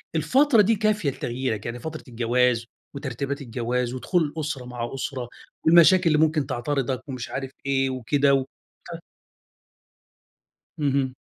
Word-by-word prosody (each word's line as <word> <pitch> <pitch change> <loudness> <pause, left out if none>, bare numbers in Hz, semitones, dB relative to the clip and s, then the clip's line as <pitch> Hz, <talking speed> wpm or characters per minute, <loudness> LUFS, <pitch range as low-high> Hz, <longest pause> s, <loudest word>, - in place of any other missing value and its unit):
الفترة 235 - +4
دي 225 +3 +3
كافية 210 -7 +1
لتغييرك، 120 -4 -3
يعني 120 +1 -4
فترة 155 +4 -7
الجواز 120 0 +1 0.3
وترتيبات 140 +1 -4
الجواز، 120 0 -2
ودخول 165 +7 0
الأسرة 145 -3 -4
مع 120 -1 -5
أسرة، 130 -2 -4 0.4
والمشاكل 170 +3 +7
اللي 155 -2 +4
ممكن 155 -1 +2
تعترضك 130 -1 -2
ومش 125 -2 -5
عارف 135 -1 -5
إيه 135 -1 +1
وكده، 135 +2 +2 0.5
ف - - -9 1.8
اهم. 135 -2 0
135 Hz, 120 wpm, -24 LUFS, 125-155 Hz, 1.8 s, والمشاكل